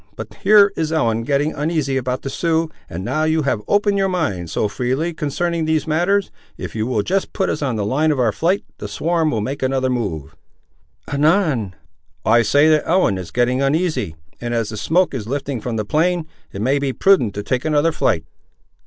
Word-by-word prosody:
But - - -8
here 205 -1 +6
is 160 -1 -1
Ellen 115 -8 +1
getting 140 +5 0
uneasy 150 -2 -1
about 130 0 -2
the 135 - -3
Siouxes, 165 +1 0 0.2
and 90 +2 -6
now 155 +7 0
you 155 0 +1
have 130 -6 0
opened 205 -1 +2
your 195 0 +2
mind, 100 - -2
so 105 - 0
freely, 130 +10 -2
concerning 160 +2 -2
these 155 -1 +1
matters, 175 +5 +1 0.3
if - - -7
you 110 0 -1
will 110 -5 0
just 195 - -1
put 190 - 0
us 150 - -3
on 130 -5 -1
the 105 -2 -1
line 145 +9 +1
of 145 - -1
our 120 -3 +3
flight, 180 - 0 0.2
the 105 - -5
swarm 160 +9 0
will 110 -7 -1
make 135 +6 -4
another 130 0 0
move." 85 - -3 0.8
"Anan!" 145 - +2 0.5
"I 115 +3 +5
say 145 +7 +4
that 155 -1 +2
Ellen 165 - +2
is 90 -3 -7
getting 125 +6 +1
uneasy, 140 - 0 0.3
and 120 0 -2
as 115 -2 -1
the 110 - -6
smoke 175 - +1
is 115 -5 -4
lifting 135 -2 -3
from 120 0 -3
the 110 -1 -2
plain, 170 - +1 0.3
it 100 - -5
may 135 +4 +2
be 140 -2 -1
prudent 130 - +3
to 105 - -4
take 125 +4 -1
another 155 +1 +2
flight." 80 - 0
140 Hz, 205 wpm, -20 LUFS, 115-160 Hz, 0.8 s, here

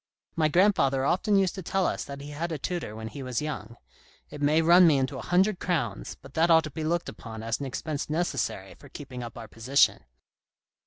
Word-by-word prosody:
My 155 -2 +3
grandfather 150 -7 +3
often 200 +6 +2
used 190 -2 +3
to 190 - -6
tell 190 +2 0
us - - -1
that 140 0 -8
he 145 +1 -8
had 165 +4 -4
a 160 - -2
tutor 165 -6 -4
when 110 0 -6
he 140 - -8
was 125 -2 -2
young. 150 -6 -5 0.5
It 145 - -8
may 150 +3 +3
run 175 +2 +7
me 150 -4 +5
into 130 -1 -1
a - - -5
hundred 185 +2 +2
crowns, 175 -4 -2
but 135 - -13
that 165 +2 +2
ought 160 -1 +6
to 155 - -6
be 160 - -5
looked 170 +2 -1
upon 110 -1 -8
as 115 0 -2
an 140 - -4
expense 150 +3 -4
necessary 140 - -2
tor 140 - -16
keeping 130 -3 -8
up 120 -1 -8
our 115 -1 -8
position." 125 +6 +2
150 Hz, 220 wpm, -27 LUFS, 130-170 Hz, 0.5 s, run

